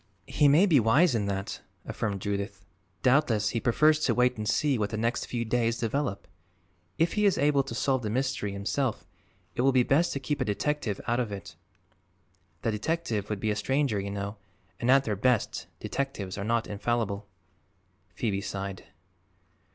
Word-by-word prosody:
"He 145 - +3
may 150 +7 +6
be 160 -8 +5
wise 130 +8 +4
in 105 -3 0
that," 100 0 -3 0.2
affirmed 100 -3 -3
Judith. 100 -1 -3 0.4
"Doubtless 125 -6 +3
he 115 - -1
prefers 150 +6 +3
to - - +1
wait 125 0 +3
and 105 -1 -3
see 140 -5 +2
what 105 -1 0
the 110 - -4
next 115 +3 0
few 115 -1 -3
days 115 0 +1
develop. 115 -3 -2 0.7
If 165 +1 +2
he 210 -1 +2
is 195 - +2
able 145 -1 +3
to 130 -4 -6
solve 130 +1 +1
the 110 - -3
mystery 130 -3 -1
himself 110 +5 -2 0.5
it - - -1
will 135 +2 +4
be 130 -1 +4
best 155 +7 +2
to 140 - -2
keep 145 +1 -2
a - - +4
detective 110 0 -1
out 120 +1 +1
of 120 -4 -1
it. 85 -4 -7 1.1
The 115 - +1
detective 110 - -2
would 105 -2 -2
be 110 +2 0
a - - 0
stranger, 130 0 0
you 100 0 -4
know, 100 +1 -4 0.4
and 120 - -1
at 135 +1 +6
their 110 -5 -1
best 120 +2 0
detectives 120 -9 -3
are 100 - -4
not 115 +2 +1
infallible." 105 -1 -2 0.9
Phoebe 100 -4 -1
sighed. 100 -1 -5
115 Hz, 180 wpm, -28 LUFS, 100-135 Hz, 1.1 s, may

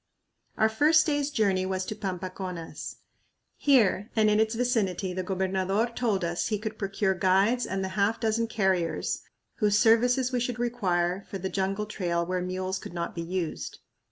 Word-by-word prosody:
Our 220 - +4
first 300 +8 +4
day's 290 -2 0
journey 200 -9 +1
was 185 0 -2
to 215 - -4
Pampaconas. 185 -3 -5 0.6
Here 225 -7 +3
and 215 -1 +4
in 210 - +3
its 220 +1 +2
vicinity 210 -7 0
the 185 - -2
gobernador 190 +4 0
told 215 -6 0
us 170 +1 -1
he 215 - 0
could 215 +1 -6
procure 195 -1 0
guides 195 +7 +2
and 190 0 -2
the 190 - -2
half 200 +4 +1
dozen 225 0 +1
carriers 190 -6 0 0.4
whose 210 -2 +3
services 245 +4 +4
we 250 - 0
should 245 -1 -2
require 190 -6 0
for 195 - -4
the 190 0 -3
jungle 195 +2 -1
trail 175 -5 -1
where 180 +1 -1
mules 185 +1 -3
could - - -9
not 170 0 -3
be 170 - -4
used. 170 -1 -4
195 Hz, 170 wpm, -27 LUFS, 185-225 Hz, 0.6 s, Our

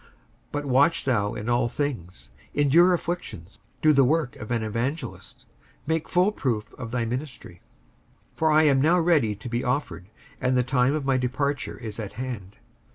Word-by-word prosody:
55:004:005 - - -25 0.4
But 145 0 -2
watch 140 +6 +3
thou 105 -6 +1
in 105 - -6
all 120 0 +2
things, 90 - -5 0.2
endure 160 +6 +5
afflictions, 170 - -4 0.2
do 155 0 +6
the 140 -1 +5
work 150 -1 +1
of 110 - -8
an 115 -2 0
evangelist, 120 +5 -4 0.4
make 160 +1 -1
full 180 +3 +3
proof 115 - -3
of 115 - -7
thy 120 0 -1
ministry. 125 - -6 0.7
55:004:006 - - -34
For 160 -1 +2
I 155 +1 +5
am 140 -3 +4
now 170 +5 +4
ready 155 -11 +2
to 110 +5 -9
be 120 +1 -2
offered, 105 - -2 0.3
and 130 0 +2
the 125 - +3
time 130 +2 +2
of 150 -3 -3
my 135 -1 +2
departure 130 +2 -2
is 110 -2 -7
at 105 -3 -5
hand. 110 -5 -6
130 Hz, 180 wpm, -25 LUFS, 115-150 Hz, 0.7 s, do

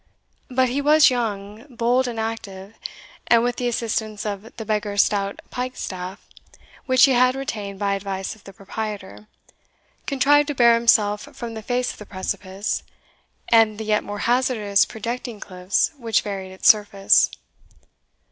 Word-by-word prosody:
But 255 0 +2
he 275 +4 -1
was 300 0 +6
young, 215 -1 -4
bold, 245 +1 +1
and 235 -2 -4
active, 210 -3 -5 0.5
and, 235 -1 +5
with 245 0 -1
the 245 - -1
assistance 220 -3 -2
of 210 +2 -5
the 220 - -6
beggar's 210 -1 +1
stout 200 -1 -2
piked 255 0 -4
staff, 185 +1 -6 0.6
which 255 -1 +6
he 275 - +2
had 255 +1 +4
retained 210 -7 -5
by 200 0 0
advice 195 -1 -4
of 220 - -19
the 195 - -11
proprietor, 195 - -7 0.8
contrived 285 +1 +3
to 295 - -3
bear 235 -2 +6
himself 215 -3 +2
from 235 -1 -6
the 220 - -6
face 245 +3 -1
of - - -17
the 210 - -10
precipice, 190 +1 -3 0.7
and 225 -2 +4
the 220 - -5
yet 210 0 +1
more 205 0 -6
hazardous 235 -5 +2
projecting 235 0 -5
cliffs 185 0 -1
which 230 -3 +1
varied 195 -2 -5
its 190 - -2
surface. 205 -2 +5
220 Hz, 155 wpm, -22 LUFS, 200-245 Hz, 0.8 s, was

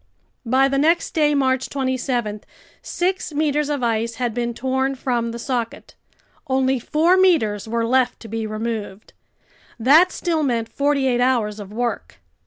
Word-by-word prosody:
By 260 +3 +4
the 275 0 0
next 330 +4 +2
day, 300 -2 +2
March 260 -2 +1
27, 255 -5 -2 0.4
six 370 -1 -2
meters 300 0 0
of 285 -4 -2
ice 230 0 0
had 240 -2 -2
been 235 0 -2
torn 265 +2 -1
from 240 -3 -1
the 230 - -6
socket. 235 -1 -4 0.5
Only 265 -1 +1
four 325 +9 +2
meters 255 - +2
were 230 +1 -1
left 255 +1 +1
to 225 - -9
be 225 0 -3
removed. 215 -2 -5 0.7
That 310 +10 +5
still 330 -3 -1
meant 235 -5 -1
forty 280 +2 0
eight 245 -2 +1
hours 230 -5 +1
of 200 -1 -9
work. 210 - -4
255 Hz, 155 wpm, -21 LUFS, 230-280 Hz, 0.7 s, That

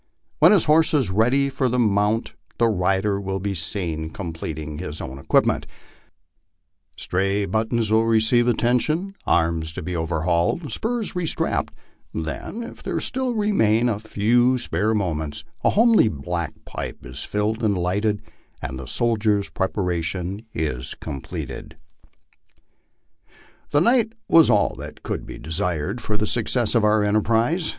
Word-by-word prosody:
When - - +7
his 200 -6 +4
horse 155 +1 +4
is 130 -10 +1
ready 125 +8 +3
for 135 -1 0
the 125 - 0
mount 105 0 +1 0.2
the 115 - +3
rider 95 +1 +1
will 95 0 -3
be 100 +1 -2
seen 80 -2 -3
completing 80 -4 -6
his 80 -4 -5
own 65 +1 -6
equipment; - - +2 1.3
stray 100 +2 0
buttons 110 +1 0
will 110 +1 +4
receive 115 +2 +3
atten 120 +1 +3
tion, 175 +9 -2
arms 80 -1 +1
be 90 +3 -4
overhauled, 85 - 0
spurs 230 -1 0
restrapped; 180 -3 -1 0.5
then, 80 - -4
if - - -10
there - - -2
still 260 -2 -1
remain 120 - +2
a 110 -4 0
few 120 +4 +2
spare 110 -1 0
moments, 80 -7 -2 0.2
the - - +3
homely 225 - +5
black 85 0 -3
pipe - - -6
is 65 +3 -6
filled 105 +2 -1
and 100 -3 +2
lighted, 100 +4 0 0.4
and 65 -1 -5
the 65 - -8
soldier's 105 - +1
preparation 90 0 -2
is 75 -4 -3
completed. 70 -2 -7 1.9
The 145 - +3
night 230 +1 +3
was 165 -2 +6
all 105 - +3
that - - -9
could - - -4
be - - -8
desired 80 +6 -2
for 105 -1 -2
the 105 - 0
success 120 +1 +1
of 115 -3 +3
our 105 0 +4
enterprise. 115 - +1
105 Hz, 140 wpm, -23 LUFS, 85-120 Hz, 1.9 s, When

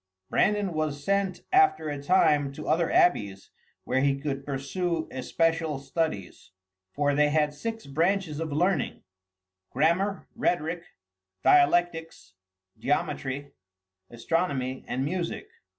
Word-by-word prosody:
Brandan 205 -3 +2
was 155 -2 -2
sent 200 -1 0
after 380 - +4
a 145 -2 -4
time 150 -3 +3
to - - -8
other 165 +2 +2
abbeys, 100 - +2 0.3
where 130 - 0
he 140 0 +2
could 140 -1 -3
pursue 160 +5 -2
especial 160 +3 0
studies, 135 - -3 0.4
for 145 +3 +1
they 150 +1 +3
had 150 -1 +1
six 225 +9 -5
branches 165 +2 0
of 160 -2 -3
learning, 175 0 0 0.7
grammar, 190 +5 +1
rhetoric, 170 0 0 0.6
dialectics, 165 - +2 0.5
geometry, 140 0 -2 0.6
astronomy, 130 +1 -2
and 130 +2 -1
music. 180 - -3
155 Hz, 110 wpm, -27 LUFS, 140-175 Hz, 0.7 s, after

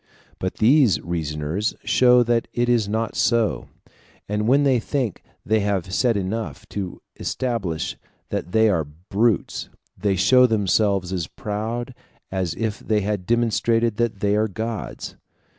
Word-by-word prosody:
But 95 - -2
these 120 - +4
reasoners 80 +3 -2
show 125 +3 +5
that 120 0 +1
it 120 0 +1
is 115 -4 +2
not 110 +1 -2
so; 110 - +1 0.6
and 105 +1 -1
when 140 +4 +4
they 135 -3 +3
think 125 - -2 0.2
they 110 +1 +2
have 100 -2 -1
said 120 0 +2
enough 110 +2 -4
to 95 -3 -5 0.2
establish 105 -11 -2 0.3
that 90 - -3
they 110 +2 +4
are 90 -7 +2
brutes, 95 +8 -1 0.3
they 100 -2 0
show 125 +7 +5
themselves 100 -3 +1
as 90 -4 -2
proud 110 +4 -4 0.4
as 90 -3 -2
if 110 -2 -2
they 110 -1 0
had 100 -2 -2
demonstrated 115 -1 +1
that 115 -4 -1
they 100 0 +2
are 110 +1 +2
gods. 110 +2 -5
105 Hz, 140 wpm, -23 LUFS, 95-115 Hz, 0.6 s, show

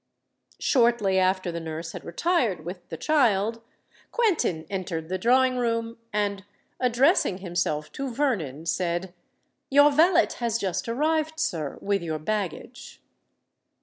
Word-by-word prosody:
Shortly 235 -7 +3
after 185 -1 +1
the 170 - -4
nurse 165 0 -6
had - - -8
retired 215 - 0
with 175 0 -8
the 165 - -5
child, 230 - +2 0.5
Quentin 335 - +1
entered 170 -4 -4
the 185 0 -2
drawing 255 +4 +3
room, 230 -1 -1
and, 200 -1 -1 0.4
addressing 250 - +3
himself 170 -5 -2
to 275 0 -4
Vernon, 190 - -1
said, 175 +1 -1 0.6
"Your 285 +2 +6
valet 335 +4 +4
has 235 -2 0
just 195 +1 -2
arrived, 315 +5 0
sir, 165 - -2
with 200 0 0
your 160 -2 -3
baggage." 190 +1 -4
205 Hz, 125 wpm, -26 LUFS, 175-255 Hz, 0.6 s, Your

